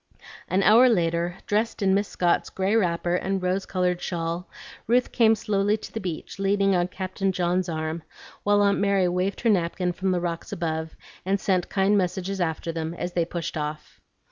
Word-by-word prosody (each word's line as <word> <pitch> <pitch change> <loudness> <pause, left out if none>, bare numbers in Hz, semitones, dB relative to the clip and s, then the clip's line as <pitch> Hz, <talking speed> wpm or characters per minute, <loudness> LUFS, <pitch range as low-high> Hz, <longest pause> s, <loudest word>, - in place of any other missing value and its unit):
An 190 +1 +1
hour 235 +5 +7
later, 170 -3 0
dressed 215 +1 0
in 190 -1 +3
Miss 200 +1 +1
Scott's 175 -1 +1
gray 190 +3 0
wrapper 175 -4 +1
and 190 +2 0
rose 185 +1 -1
colored 180 -1 0
shawl, 170 +1 -3 0.4
Ruth 245 +2 +2
came 225 -2 +4
slowly 205 -1 +1
to - - -11
the 225 - -3
beach 180 -1 -6
leaning 195 0 +2
on 175 0 +2
Captain 190 +1 -2
John's 180 0 0
arm, 160 0 -3 0.4
while 205 0 +3
Aunt 200 0 +3
Mary 200 -2 +2
waved 180 +3 -1
her 235 - +2
napkin 180 -1 0
from 190 +2 -2
the 180 -1 +1
rocks 170 -1 -4
above, 160 -1 -3 0.3
and 195 +2 0
sent 185 -3 0
kind 200 +1 +3
messages 190 +1 -2
after 165 0 -2
them 165 0 -4
as 175 0 -4
they 170 -2 +1
pushed 170 0 -5
off. 150 0 -5
185 Hz, 185 wpm, -25 LUFS, 170-200 Hz, 0.4 s, hour